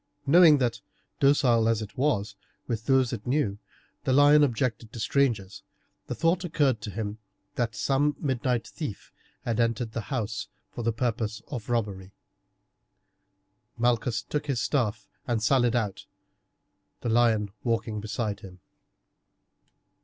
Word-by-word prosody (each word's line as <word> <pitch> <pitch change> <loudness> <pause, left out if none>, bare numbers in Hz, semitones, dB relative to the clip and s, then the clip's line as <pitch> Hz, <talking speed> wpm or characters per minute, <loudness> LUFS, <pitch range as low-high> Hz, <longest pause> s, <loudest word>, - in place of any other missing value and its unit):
Knowing 160 +1 +7
that, 125 -3 -1 0.4
docile 125 -5 +4
as 115 -2 +2
it 105 -1 -7
was 125 -7 0 0.3
with 115 -2 -4
those 130 -2 +3
it - - -6
knew, 125 -7 0 0.4
the 130 - 0
lion 145 +2 +6
objected 115 -4 -1
to 115 - -8
strangers, 110 -6 0 0.5
the - - -3
thought 170 +3 +1
occurred 145 -9 +1
to 110 - -5
him 105 +1 -4 0.3
that 115 -2 -2
some 145 +2 +1
midnight 125 -3 -1
thief 135 -11 -7 0.3
had 115 -1 -1
entered 115 -1 0
the 115 - -3
house 115 -6 -3 0.2
for - - -6
the 115 0 +1
purpose 115 -2 -2
of 120 -4 -6
robbery. 100 -5 -2 1.6
Malchus 120 0 +1
took 150 0 -3
his 135 -4 0
staff 110 -4 -1 0.2
and 115 -3 0
sallied 120 -1 +3
out, 105 -5 -2 0.9
the 120 - -2
lion 110 -3 +3
walking 115 -2 -1
beside 105 -1 -3
him. 95 -2 -12
120 Hz, 135 wpm, -27 LUFS, 110-135 Hz, 1.6 s, Knowing